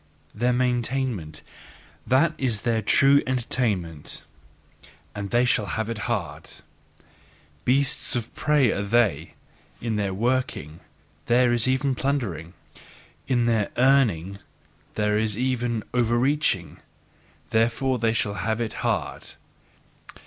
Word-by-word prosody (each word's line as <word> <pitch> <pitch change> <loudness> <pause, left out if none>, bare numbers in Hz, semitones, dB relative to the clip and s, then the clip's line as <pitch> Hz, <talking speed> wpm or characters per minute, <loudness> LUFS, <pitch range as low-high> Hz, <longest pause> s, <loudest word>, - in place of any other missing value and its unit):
Their 120 +4 +1
maintainment 125 - -1 0.6
that 145 +6 +3
is 120 -6 -1
their 115 -2 0
true 140 +6 +5
entertainment; 105 - -2 0.9
and 100 -1 -5
they 120 +3 +3
shall 110 -4 +1
have 110 0 -2
it 115 -1 -4
hard! - - -3 1.2
Beasts 135 +2 +2
of 120 -1 -3
prey, 150 -6 +2
are - - -2
they: 110 0 +1 0.4
in 115 -2 -2
their 100 -2 -1
"working" 110 - -2 0.5
there 120 0 +4
is 120 0 +1
even 130 +1 +1
plundering, 105 - -2 0.7
in 120 -3 +2
their 115 -3 +1
"earning" 110 -9 +2 0.6
there 105 0 +1
is 110 -2 -1
even 120 -3 -1
overreaching! 120 - +1 0.7
Therefore 120 +3 +1
shall 105 -2 -1
they - - -6
have 110 0 -1
it 115 -2 -2
hard! - - -2
120 Hz, 115 wpm, -25 LUFS, 105-130 Hz, 1.2 s, true